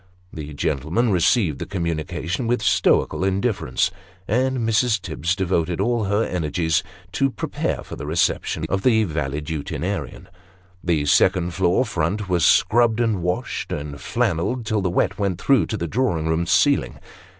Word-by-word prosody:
The 75 -2 -7
gentlemen 80 - 0
received 90 - +2
the - - -5
communication 85 - -3
with 120 -2 0
stoical 95 - +2
indifference, 95 - 0 0.4
and 130 +4 +1
Mrs. 110 0 +2
Tibbs 85 -1 -2
devoted 90 -2 -1
all 115 +1 +1
her 100 +3 +1
energies 80 -2 0 0.3
to 135 +6 +1
prepare - - -3
for - - -8
the 75 - -7
reception 80 0 0
of 95 +2 -1
tho 110 -1 +3
valetudinarian. 75 -1 -4 0.6
The 80 -5 +1
second 90 +3 +3
floor 95 +7 +2
front 100 +1 -2
was 90 -3 +1
scrubbed, 115 -1 +4
and 110 -6 +1
washed, 90 +1 -3
and 75 0 -4
flannelled, 100 +9 -1
till 110 -2 0
the 95 - 0
wet 90 - 0
went 95 -3 -1
through 135 +4 +3
to 110 - -3
the 85 - -3
drawing 85 -6 0
room 80 +1 0
ceiling. - - +2
90 Hz, 150 wpm, -22 LUFS, 80-110 Hz, 0.6 s, scrubbed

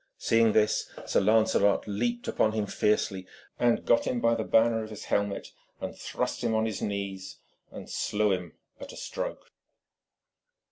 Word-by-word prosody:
Seeing 115 -1 +3
this, 105 -1 +2 0.2
Sir - - +2
Lancelot 105 -1 +3
leaped 120 +4 -2
upon 110 - +1
him 110 -1 0
fiercely, 100 -2 0 0.3
and 120 -1 +2
got 115 - +3
him 125 - 0
by 115 0 +3
the 115 -1 -1
banner 115 0 +3
of 110 - -8
his 105 -2 -8
helmet, 100 -1 -1 0.3
and - - -5
thrust - - -3
him 115 -2 +1
on 110 0 +2
his 110 -3 -3
knees, 100 -2 -4 0.3
and - - -9
slew 105 0 0
him 90 -4 -3 0.3
at - - -8
a - - -11
stroke. - - -5
110 Hz, 160 wpm, -28 LUFS, 100-115 Hz, 0.3 s, Seeing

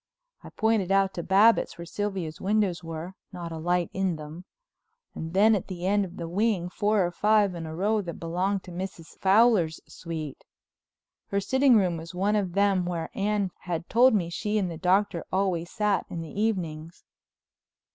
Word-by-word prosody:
I - - -9
pointed 220 -4 0
out 195 -1 +3
to 170 - -4
Babbitts 200 +6 +4
where 170 - -7
Sylvia's 190 -4 -4
windows 195 -3 0
were, 165 +2 -6 0.2
not 175 -3 -7
a 160 - -5
light 175 +1 0
in 190 -2 0
them; 155 +3 -9 0.7
and 160 +2 -6
then, 215 +3 +6
at 200 - -1
the 180 -2 -6
end 200 +1 +2
of 180 - -11
the 170 - -5
wing, 190 0 0
four 205 0 +2
or 175 - -2
five 210 +1 +3
in 165 -2 -6
a 160 - -6
row 210 +5 +1
that 170 -4 -6
belonged 185 +4 -2
to 180 - -11
Mrs. 175 -2 -7
Fowler's 195 -5 +4
suite. 160 -4 -7 0.8
Her 200 - 0
sitting 260 +5 +4
room 180 -4 +1
was 165 +2 -9
one 200 +4 +1
of 195 -4 -1
them 200 -1 +2
where 170 -2 -3
Anne 200 -1 0
had 170 -2 -4
told 245 +1 +5
me 175 -4 -1
she 210 +4 -1
and 190 -4 0
the 165 - -6
Doctor 185 -1 +1
always 185 -3 0
sat 210 -4 0
in 170 - -5
the 160 - -9
evenings. 170 -6 -3
185 Hz, 185 wpm, -27 LUFS, 170-205 Hz, 0.8 s, then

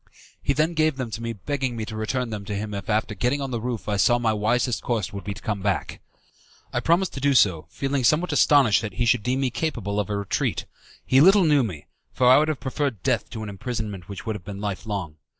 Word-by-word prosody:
He 140 - +1
then 155 +4 +1
gave 155 -2 +2
them 125 -4 -4
to 115 - -5
me 115 0 -3
begging 130 +3 -3
me 110 -1 -3
to 110 - -7
return 115 +3 -2
them 105 -2 -4
to 105 - -4
him 105 +1 -4
if 100 0 -6
after 110 0 0
getting 125 +8 0
on 135 -2 -4
the 120 -2 -2
roof 120 -2 -4
I 105 -1 0
saw 120 +4 +4
my 115 -2 +1
wisest 120 +3 0
course 110 -6 -2
would 100 - -6
be 100 -1 -4
to 115 - -11
come 105 -2 -2
back. 100 -2 -2 0.7
I - - +1
promised 175 +3 +2
to - - -5
do 140 0 +2
so, 90 -10 +3
feeling 135 -1 -2
somewhat 155 +9 +2
astonished 135 -10 +5
that 110 -3 -5
he 120 - 0
should 120 -1 +3
deem 125 +4 -1
me 130 -2 0
capable 115 -6 -2
of 105 - -2
a 105 - -1
retreat. 100 -1 -1 0.4
He 130 +1 +5
little 195 +4 +7
knew 150 -4 +4
me, 90 - -4 0.3
for 125 - +1
I 130 +3 +8
would 155 - +2
have 155 -3 -2
preferred 130 -5 -2
death 125 -4 0
to 110 -1 -6
an 105 - -5
imprisonment 105 -3 -5
which 100 - -7
would 110 - -2
have 100 - -8
been 100 +1 -7
life 105 +1 -4
long. 95 -8 -4
115 Hz, 255 wpm, -24 LUFS, 105-135 Hz, 0.7 s, I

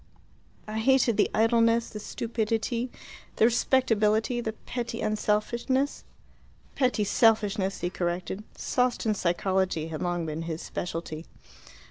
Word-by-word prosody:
"I 215 +1 -3
hated 250 -1 +3
the - - +3
idleness, 230 +1 +3
the 215 - -6
stupidity, 230 +2 -2 0.5
the - - +4
respectability, 230 -1 +2
the 220 -2 -3
petty 235 0 -5
unselfishness." 225 +6 0 0.7
"Petty 250 -5 +1
selfishness," 205 -2 +2
he 175 +1 -1
corrected. 180 +3 -3
Sawston 250 -3 +1
psychology 185 -2 0
had 155 -2 -5
long 175 -1 -1
been 155 +1 -4
his 165 0 -4
specialty. 165 -2 -5
215 Hz, 110 wpm, -27 LUFS, 185-235 Hz, 0.7 s, the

